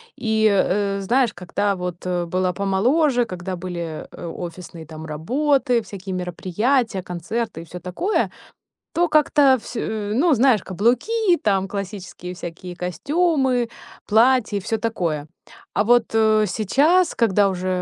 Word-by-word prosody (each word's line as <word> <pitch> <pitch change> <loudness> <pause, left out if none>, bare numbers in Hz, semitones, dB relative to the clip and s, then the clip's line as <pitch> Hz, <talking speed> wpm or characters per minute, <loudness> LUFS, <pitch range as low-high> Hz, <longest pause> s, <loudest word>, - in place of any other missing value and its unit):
И, 220 -1 +2
э, 200 0 +1
знаешь, 235 +3 +2
когда 200 +3 -1
вот, 180 -1 -6
э, 180 -1 -1
была 185 +1 0
помоложе, 240 - +2
когда 185 -2 -5
были, 170 -3 -5
э, - - -9
офисные, 170 -1 -8
там, 160 0 -9
работы, 250 - +1
всякие 195 -3 -7
мероприятия, 190 +6 0
концерты 180 +3 -4
и - - -11
всё 180 +2 -9
такое. 185 - -1 0.6
То 345 +1 +2
как-то 295 -3 +4
всю 230 +1 -6
у 210 -1 -3
ну, 305 +6 +4
знаешь, 250 -3 +4
каблуки 250 - +1
и - - +5
там 195 - +1
классические 195 -2 -6
всякие 175 +1 -8
костюмы, 260 - 0 0.4
платья 225 0 +3
и - - -5
всё 225 +4 -2
такое. 170 -11 -2 0.5
А - - +3
вот, 240 +1 +5
э, 215 -1 +4
сейчас, 285 - +2
когда 205 -3 +3
уже, 185 -1 -3
205 Hz, 140 wpm, -22 LUFS, 180-245 Hz, 0.6 s, и